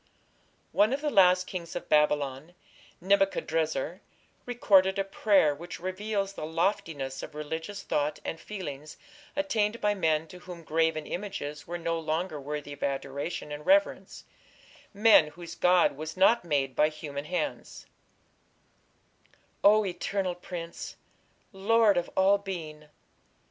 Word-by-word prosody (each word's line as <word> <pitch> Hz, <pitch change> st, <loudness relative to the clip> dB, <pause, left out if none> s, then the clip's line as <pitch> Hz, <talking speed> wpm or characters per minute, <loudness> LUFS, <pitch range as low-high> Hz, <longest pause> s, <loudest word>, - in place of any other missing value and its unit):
One 205 Hz, +7 st, +3 dB
of 280 Hz, -, -2 dB
the 300 Hz, -1 st, -1 dB
last 185 Hz, -3 st, +5 dB
kings 170 Hz, -3 st, -6 dB
of 175 Hz, -, -5 dB
Babylon, 150 Hz, +1 st, +1 dB, 0.5 s
Nebuchadrezzar, 175 Hz, -3 st, 0 dB, 0.5 s
recorded 195 Hz, -6 st, +4 dB
a 195 Hz, -, +1 dB
prayer 195 Hz, -5 st, +3 dB
which 170 Hz, +4 st, -8 dB
reveals 195 Hz, +2 st, -2 dB
the -, -, -7 dB
loftiness 160 Hz, -5 st, -2 dB
of -, -, -9 dB
religious 160 Hz, +6 st, -5 dB
thought 150 Hz, +1 st, -1 dB
and 165 Hz, -, -4 dB
feeling 155 Hz, -8 st, -7 dB, 0.5 s
attained 235 Hz, -7 st, 0 dB
by 210 Hz, 0 st, +2 dB
men 160 Hz, -5 st, +1 dB
to 180 Hz, -, -11 dB
whom 175 Hz, -2 st, -10 dB
graven 160 Hz, -1 st, 0 dB
images 175 Hz, -7 st, -5 dB
were 175 Hz, -, -4 dB
no 165 Hz, -1 st, -2 dB
longer 160 Hz, 0 st, -2 dB
worthy 145 Hz, +1 st, -5 dB
of 145 Hz, -, -13 dB
adoration 140 Hz, +3 st, -3 dB
and 150 Hz, 0 st, -7 dB
reverence 295 Hz, +1 st, +2 dB, 0.7 s
men 210 Hz, -6 st, +6 dB
whose 170 Hz, +2 st, -9 dB
god 180 Hz, -4 st, +3 dB
was 155 Hz, +4 st, -7 dB
not 210 Hz, +4 st, +5 dB
made 140 Hz, -6 st, 0 dB
by 150 Hz, -, +4 dB
human 145 Hz, -2 st, -7 dB
hands 180 Hz, -, -4 dB, 1.8 s
O 210 Hz, +1 st, +6 dB
eternal 185 Hz, 0 st, -2 dB
prince! 175 Hz, -1 st, -7 dB, 0.6 s
Lord 210 Hz, +2 st, +4 dB
of 175 Hz, -1 st, -1 dB
all 195 Hz, +1 st, +5 dB
being! 160 Hz, -6 st, -7 dB
175 Hz, 130 wpm, -28 LUFS, 150-195 Hz, 1.8 s, men